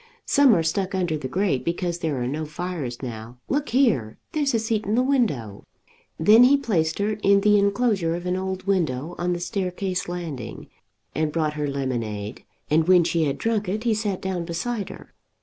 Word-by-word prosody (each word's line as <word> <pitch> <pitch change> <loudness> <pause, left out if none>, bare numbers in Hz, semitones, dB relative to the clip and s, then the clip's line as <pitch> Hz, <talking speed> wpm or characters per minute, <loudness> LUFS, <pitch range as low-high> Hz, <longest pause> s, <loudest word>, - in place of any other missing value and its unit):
Some 280 -6 +5
are 165 - +1
stuck 190 +3 -1
under 175 -4 0
the 145 -4 -4
grate 170 -2 0
because 175 0 -2
there 155 -6 -1
are - - -1
no 150 +4 -2
fires 150 -5 -5
now. 115 0 -7
Look 285 +2 0
here; 225 - +2
there's 285 -5 0
a - - +4
seat 220 -2 -1
in 210 - +1
the 250 - +3
window." 155 - 0 0.5
Then 215 +9 +7
he 275 +3 +6
placed 180 - 0
her 210 +1 -1
in 200 0 +4
the 210 0 +5
inclosure 200 -4 +1
of 175 +1 -6
an 180 0 0
old 190 0 -3
window 165 -6 0
on 175 +1 0
the 175 - -3
staircase 185 -1 -2
landing, 160 -10 -6 0.4
and 155 -1 0
brought 155 -1 0
her 150 -1 -2
lemonade, 120 -6 -3 0.2
and 160 +2 +2
when 180 -2 +6
she 165 -1 +1
had 140 -1 -1
drunk 215 -4 -1
it 215 +4 -2
he 235 -2 +2
sat 210 -3 -2
down 185 -2 -2
beside 200 +6 -3
her. - - -12
180 Hz, 195 wpm, -24 LUFS, 150-210 Hz, 0.5 s, Then